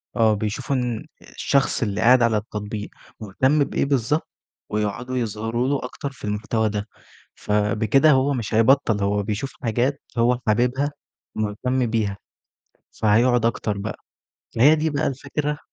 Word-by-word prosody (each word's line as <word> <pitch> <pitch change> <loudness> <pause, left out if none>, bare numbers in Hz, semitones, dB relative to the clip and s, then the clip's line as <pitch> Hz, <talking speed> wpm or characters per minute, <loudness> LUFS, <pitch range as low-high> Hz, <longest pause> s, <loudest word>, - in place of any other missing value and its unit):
آه، 110 -1 +4
بيشوفوا 110 +6 -2
إن 125 -3 -2 0.2
الشخص 140 0 0
اللي 105 -1 -2
قاعد 125 +2 +6
على 115 -2 +3
التطبيق 105 0 -5 0.3
مهتم 130 +8 +1
بإيه - - -1
بالضبط، 140 +2 0 0.4
ويقعدوا 105 +5 -2
يظهروا 115 +1 -2
له 140 -2 -1
أكتر 140 +2 -6
في 135 - -18
المحتوى 110 +1 -1
ده، 105 0 -4 0.5
ف - - -7
بِكده 110 +7 +3
هو 135 +1 +3
مش 115 -4 -4
هيبطّل، 115 -1 +3
هو 100 +1 +1
بيشوف 105 +7 -3
حاجات 125 +5 0 0.2
هو 120 +1 +3
حاببها، 125 +6 +1 0.4
مهتم 120 +5 -1
بيها، 110 -4 -1 0.8
فهيقعد 115 +2 +3
أكتر 105 -3 -1
بقى 105 +2 -5 0.6
ما 115 - +2
هي 150 +4 +8
دي 160 +1 0
بقى 150 +1 -1
الفكرة. 145 +2 -3
115 Hz, 145 wpm, -23 LUFS, 105-135 Hz, 0.8 s, هي